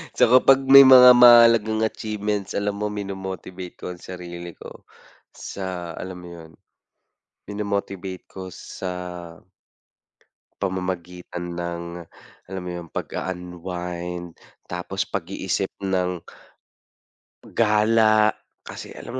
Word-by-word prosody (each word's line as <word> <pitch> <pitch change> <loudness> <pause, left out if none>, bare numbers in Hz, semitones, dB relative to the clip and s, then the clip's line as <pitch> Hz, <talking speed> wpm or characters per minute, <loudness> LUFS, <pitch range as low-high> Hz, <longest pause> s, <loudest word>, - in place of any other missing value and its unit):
Tsaka 125 +1 +6
'pag 135 0 +6
may 135 0 +9
mga 125 -1 +10
mahalagang 115 -2 +7
achievements, 105 -2 -3
alam 100 0 -1
mo, 105 - -1
mino-motivate 95 -2 -7
ko - - -6
ang 90 - -10
sarili 85 -2 -8
ko, - - -13 0.5
sa 90 -3 -6
alam 90 0 -7
mo 90 - -11
yun, 80 -2 -12 1.0
mino-motivate 100 -2 -4
ko 95 -1 -8
sa 90 +1 -7 1.7
pamamagitan 90 -2 -4
ng, 85 0 -4 0.7
alam 95 -1 -5
mo - - -5
yun, 85 -1 -7
pag-a-unwind, 90 -1 -6 0.3
tapos 90 +2 -4
pag-iisip 95 +1 -3 0.2
ng 90 -1 0 1.3
gala 110 -1 +3 0.3
kasi - - -9
alam - - -9
95 Hz, 100 wpm, -23 LUFS, 90-105 Hz, 1.7 s, mga